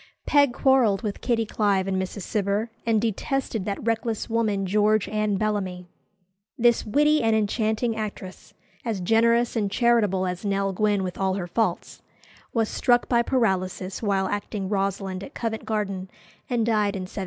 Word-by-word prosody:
Peg 285 -3 +4
quarrelled 245 -6 +3
with 210 -2 -4
Kitty 230 -2 +1
Clive 200 -3 +1
and 190 -1 0
Mrs. 190 +1 -5
Cibber, 205 +3 -1 0.2
and 225 -2 +3
detested 225 0 -2
that 200 +1 -4
reckless 230 -1 -1
woman 220 -4 0
George 210 +2 +2
Anne 215 -1 0
Bellamy. 190 -4 -2 0.7
This 235 -1 +3
witty 300 +6 +3
and 225 -1 +2
enchanting 220 +2 0
actress, 205 -4 -7 0.3
as 225 -4 -2
generous 230 +5 +2
and 210 -3 0
charitable 210 -4 +2
as 180 +1 -4
Nell 195 -1 0
Gwynn 205 0 +1
with 180 -1 -5
all 190 -1 +1
her 190 -3 -3
faults, 220 +6 -2 0.5
was 225 -2 +1
struck 245 +2 +2
by 235 -1 +3
paralysis 190 -6 -1
while 195 -3 +1
acting 205 -1 -3
Rosalind 195 -1 -2
at 275 - -11
Covent 225 -1 -3
Garden, 195 -4 -2 0.4
and 240 -3 +1
died 210 -3 +1
in 190 - -3
1760. 185 +2 -7
210 Hz, 160 wpm, -25 LUFS, 195-230 Hz, 0.7 s, Peg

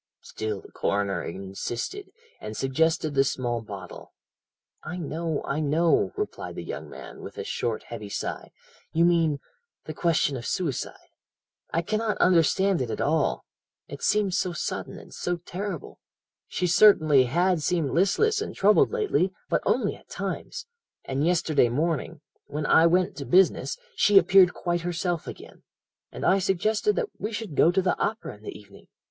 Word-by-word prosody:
"Still 110 -2 -5
the - - -16
coroner 100 -3 -1
insisted, 100 - -5 0.3
and 105 0 -7
suggested 155 +3 +1
the 135 -1 +4
small 120 -3 -2
bottle. 100 -4 -10 0.7
"'I 175 +3 -6
know, 160 -1 -3
I 140 - -2
know,' 155 +3 +2
replied 420 +1 -5
the - - -6
young - - -7
man, - - -10
with - - -10
a 445 - -3
short, 120 - -3
heavy 110 -3 -8
sigh. - - -4 0.4
'You 165 +1 +4
mean 165 -4 +2 0.5
the 155 - -6
question 155 -3 +1
of 120 - -6
suicide 165 - -3 0.6
I 165 - 0
cannot 215 +3 -1
understand 185 +1 +3
it 125 - -2
at - - -4
all 155 0 0 0.4
it - - -9
seems 205 -3 +2
so 180 - -1
sudden - - -4
and - - -13
so 175 0 -2
terrible 180 0 -6 0.5
she 180 - -2
certainly 155 -7 +6
had 175 +6 +1
seemed 160 -3 0
listless 415 - +2
and 430 - -5
troubled 205 +2 +4
lately 420 - +1 0.2
but - - +1
only - - +1
at - - -20
times - - -5 0.4
and 135 +4 0
yesterday 165 -7 +2
morning, 150 +3 -2 0.3
when 150 +1 -4
I 160 +2 +6
went 180 +3 +2
to - - -5
business, 190 - +3 0.2
she 205 -1 +5
appeared 190 -2 +6
quite 175 -1 -1
herself 175 -1 -2
again, - - -10 0.5
and - - -5
I 195 - +4
suggested 210 - +1
that 475 -4 -1
we 210 - -3
should 210 -6 -5
go 165 - +5
to 190 +1 +1
the 180 - +2
opera 220 - -2
in 105 - -20
the - - -8
evening. 100 -1 -17
170 Hz, 165 wpm, -26 LUFS, 140-190 Hz, 0.7 s, certainly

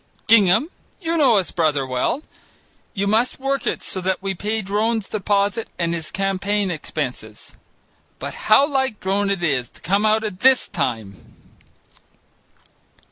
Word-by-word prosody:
Gingham, 215 - +4 0.3
you 335 -3 -2
know 270 -9 +4
his 190 - -1
brother 150 -5 +1
well; 130 - -1 0.7
you 200 0 0
must 220 +5 +1
work 275 0 -1
it - - -2
so 185 - -4
that 190 +1 0
we 195 0 -3
pay 215 +4 -3
Drone's 215 +2 -1
deposit 205 +1 0
and 170 -1 0
his 165 -2 -3
campaign 195 0 -1
expenses. 155 -3 -6 0.6
But - - -6 0.2
how 280 - +6
like 265 -6 -1
Drone 195 +1 0
it 195 -3 -1
is 135 -7 0
to - - -20
come 200 +3 +1
out 215 +1 +2
at 205 -4 -5
this 260 +2 +4
time!" 110 - -4
200 Hz, 145 wpm, -21 LUFS, 180-225 Hz, 0.7 s, how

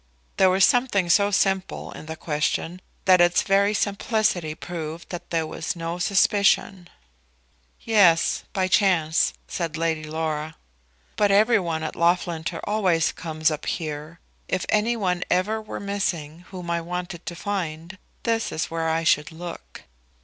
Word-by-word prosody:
There 190 -1 +5
was 185 +1 +5
something 205 -8 +2
so 200 +3 +4
simple 195 -1 0
in 155 - -10
the 160 - -5
question 160 +3 -2 0.2
that 185 -2 +6
its 175 0 +4
very 200 +2 +3
simplicity 200 -6 0
proved 165 -1 -7
that 175 - -7
there 165 -1 0
was 155 +2 -4
no 170 +1 -4
suspicion. 195 -1 +2 0.9
"Yes; 195 -7 +4
by 190 -1 0
chance," 175 -5 +2
said 165 -3 -3
Lady 160 -1 -1
Laura. 155 0 -3 0.6
"But 205 -1 +3
every 215 +3 +4
one 165 -3 -3
at 155 - -4
Loughlinter 170 -1 0
always 185 -6 +1
comes 160 -1 -1
up 150 - -5
here. 155 0 -4 0.3
If 185 - -1
any 225 +3 +2
one 180 -4 0
ever 210 +5 +1
were 215 - -7
missing 180 -5 -3
whom 180 -3 -6
I 170 0 0
wanted 175 0 -5
to 175 - -4
find, 170 -2 -4 0.2
this 225 -1 0
is 160 - -3
where 165 0 -1
I 165 +1 0
should 150 -1 +2
look." 170 +1 -9
175 Hz, 150 wpm, -24 LUFS, 160-195 Hz, 0.9 s, that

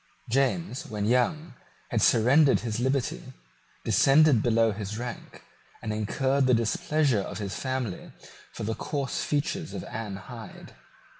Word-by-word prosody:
James, 135 +3 0
when 105 -5 -3
young, 125 +8 +1 0.4
had - - +1
surrendered 135 +6 +5
his 115 -1 -3
liberty, 130 +1 0 0.6
descended 140 -3 +5
below 115 -1 +3
his 105 0 -5
rank, 120 0 -7 0.4
and 110 -1 -4
incurred 130 +6 +1
the 125 - +5
displeasure 120 +2 +1
of 95 - -6
his 100 -2 -4
family 130 -7 -4 0.4
for - - -7
the 110 +2 -1
coarse 140 +2 -3
features 155 +3 -2
of 180 - -5
Anne 110 - -5
Hyde. 115 +3 -10
125 Hz, 135 wpm, -27 LUFS, 110-140 Hz, 0.6 s, surrendered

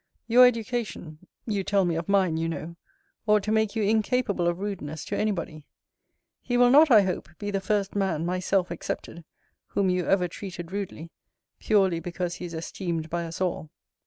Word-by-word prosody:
Your 250 +2 +8
education 225 -9 -3 0.3
(you 205 -4 -1
tell 195 -1 +2
me 175 - 0
of 165 +2 -4
mine, 190 -5 +3
you 165 +1 -1
know) 165 +1 -6 0.5
ought 210 -1 +4
to 215 - -2
make 220 -1 +1
you 220 - 0
incapable 215 -3 +1
of 175 0 0
rudeness 175 -7 -5
to - - -3
any 215 - +1
body. 160 -6 -4 0.8
He 245 -1 -1
will 245 0 +6
not, 300 +3 +7
I 215 -5 +7
hope, 185 -1 -3
be 205 -1 -4
the 195 -1 -1
first 200 0 -1
man, 190 -5 0
myself 180 0 0
excepted, 170 0 -5 0.4
whom 195 -2 +1
you 180 -1 -1
ever 185 -2 +3
treated 175 -1 -8
rudely, 185 -5 -5 0.5
purely 190 -5 +2
because 175 +1 -4
he - - -6
is 170 -1 -7
esteemed 165 -1 -4
by 170 0 -1
us 165 0 -7
all. 180 -4 -2
190 Hz, 185 wpm, -26 LUFS, 170-210 Hz, 0.8 s, Your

